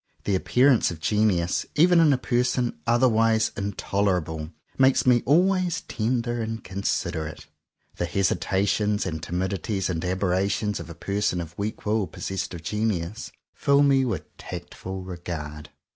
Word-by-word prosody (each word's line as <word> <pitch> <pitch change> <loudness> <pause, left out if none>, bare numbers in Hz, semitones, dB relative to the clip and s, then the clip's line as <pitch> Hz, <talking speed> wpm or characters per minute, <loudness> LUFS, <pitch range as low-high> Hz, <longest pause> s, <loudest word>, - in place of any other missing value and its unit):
The 100 - 0
appearance 125 +6 +3
of 85 - -7
genius, 95 -3 +1
even 175 +3 +5
in 160 -3 +6
a 135 - +3
person 125 -1 0
otherwise 115 -2 +3
intolerable, 90 -5 -1 0.2
makes 130 0 +4
me 125 -2 +5
always 180 +2 +3
ten 120 +2 -1
der 120 0 -3
and 115 0 -4
considerate. 85 -5 -3 0.5
The 85 - -1
hesitations 100 +2 +1
and 80 -4 -3
timidities 95 +3 -2
and 80 -1 -3
aberrations 95 +2 0
of 85 -1 -8
a 85 - -8
person 100 +1 -1
of 85 -1 -7
weak 105 +2 -4
will 105 -2 +1
possessed 95 0 -4
of 85 - -9
genius, 105 +2 -2 0.2
fill 140 0 +3
me 135 -2 +4
with 120 -3 -4
tactful 95 0 -7
regard. 80 -4 -6
100 Hz, 140 wpm, -25 LUFS, 90-120 Hz, 0.5 s, in